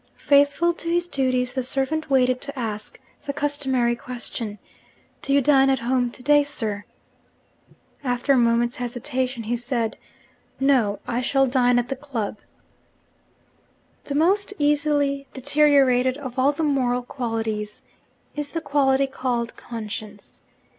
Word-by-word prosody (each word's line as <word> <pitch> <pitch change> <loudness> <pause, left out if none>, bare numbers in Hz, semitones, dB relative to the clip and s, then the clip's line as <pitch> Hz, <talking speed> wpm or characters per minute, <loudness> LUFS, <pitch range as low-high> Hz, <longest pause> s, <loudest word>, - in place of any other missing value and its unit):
Faithful 285 +4 +3
to 335 0 -6
his 345 +1 +1
duties, 255 -4 0
the 260 - -1
servant 270 +5 -1
waited 255 -2 +3
to 280 0 -5
ask 215 -3 -5 0.3
the 285 - -1
customary 275 -4 0
question, 235 -3 -5 0.6
'Do 275 - -3
you 280 0 +5
dine 270 0 +4
at 265 - +3
home 245 +1 0
to 250 - -8
day, 290 +2 +5
sir?' 220 -8 -3 1.2
After 250 +1 +1
a - - +4
moment's 235 0 +2
hesitation 250 0 -3
he 230 +3 -1
said, 240 -2 -2 0.6
'No: 255 -7 +3
I 240 +1 -1
shall 270 +1 +2
dine 250 -1 +3
at 245 0 0
the 270 - -2
club.' 250 -7 -4 1.7
The 280 - -4
most 395 +6 +2
easily 290 -1 +1
deteriorated 265 -2 +3
of 260 -3 -6
all 270 +2 +4
the 295 +2 -3
moral 250 -4 +1
qualities 225 -4 -4 0.5
is 295 -1 -4
the 330 - -2
quality 275 -2 +2
called 250 -3 -3
'conscience.' 215 -2 -8
260 Hz, 135 wpm, -23 LUFS, 240-285 Hz, 1.7 s, you